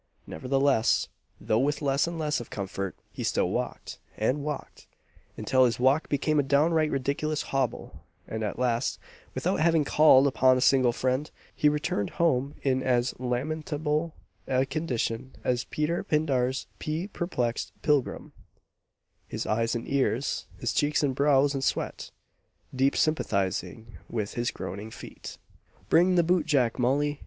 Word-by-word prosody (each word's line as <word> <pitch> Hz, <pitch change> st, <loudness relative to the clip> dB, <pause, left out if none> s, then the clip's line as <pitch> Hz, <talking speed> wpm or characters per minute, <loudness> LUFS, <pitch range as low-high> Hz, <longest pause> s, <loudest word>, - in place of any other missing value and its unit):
Nevertheless 135 Hz, -, +1 dB, 0.3 s
though 110 Hz, -, +1 dB
with 145 Hz, +2 st, +1 dB
less 140 Hz, +1 st, +1 dB
and 170 Hz, 0 st, -4 dB
less 150 Hz, -2 st, 0 dB
of 120 Hz, -, -9 dB
comfort, 95 Hz, -1 st, -4 dB, 0.2 s
he -, -, -5 dB
still -, -, +1 dB
walked, -, -, -4 dB, 0.2 s
and 130 Hz, +6 st, 0 dB
walked, 150 Hz, -1 st, -6 dB, 0.5 s
until 130 Hz, -1 st, +3 dB
his 120 Hz, -1 st, 0 dB
walk 135 Hz, +5 st, +2 dB
became 150 Hz, +1 st, +1 dB
a 135 Hz, -2 st, -1 dB
downright 155 Hz, +2 st, +3 dB
ridiculous 140 Hz, +3 st, -1 dB
hobble; 135 Hz, -3 st, -3 dB, 0.3 s
and 110 Hz, 0 st, -4 dB
at 105 Hz, -, -3 dB
last, 120 Hz, 0 st, 0 dB, 0.4 s
without -, -, 0 dB
having 165 Hz, -1 st, +3 dB
called 140 Hz, -2 st, +6 dB
upon 130 Hz, -1 st, +4 dB
a -, -, 0 dB
single 130 Hz, -1 st, +4 dB
friend, 130 Hz, +5 st, -1 dB, 0.3 s
he 150 Hz, -, +4 dB
returned 150 Hz, -9 st, -1 dB
home 140 Hz, -4 st, +1 dB
in 130 Hz, -1 st, +1 dB
as 125 Hz, -1 st, +1 dB
lamentable 150 Hz, +5 st, -2 dB, 0.3 s
a 130 Hz, 0 st, +2 dB
condition 130 Hz, -4 st, -3 dB
as 125 Hz, 0 st, 0 dB
Peter 155 Hz, +3 st, -1 dB
Pindar's 135 Hz, -4 st, 0 dB
pea 155 Hz, +4 st, -3 dB
perplexed 125 Hz, -, -2 dB
Pilgrim 145 Hz, -4 st, 0 dB, 0.9 s
"His -, -, -4 dB
eyes 115 Hz, +2 st, 0 dB
in 115 Hz, -, -3 dB
tears, 135 Hz, -1 st, -1 dB
his -, -, -2 dB
cheeks 150 Hz, +1 st, +1 dB
and 140 Hz, -2 st, +1 dB
brows 140 Hz, +1 st, +3 dB
in 135 Hz, -, -2 dB
sweat, -, -, -2 dB, 0.7 s
Deep 135 Hz, +2 st, +2 dB
sympathizing 110 Hz, -, -1 dB
with 105 Hz, -3 st, -3 dB
his 120 Hz, 0 st, -1 dB
groaning 100 Hz, +4 st, -6 dB
feet!" -, -, -10 dB, 0.5 s
"Bring 180 Hz, +2 st, +4 dB
the 175 Hz, -, +4 dB
boot 170 Hz, -2 st, +1 dB
jack, 130 Hz, -6 st, +2 dB
Molly!" 145 Hz, +4 st, +1 dB
135 Hz, 145 wpm, -27 LUFS, 125-150 Hz, 0.9 s, called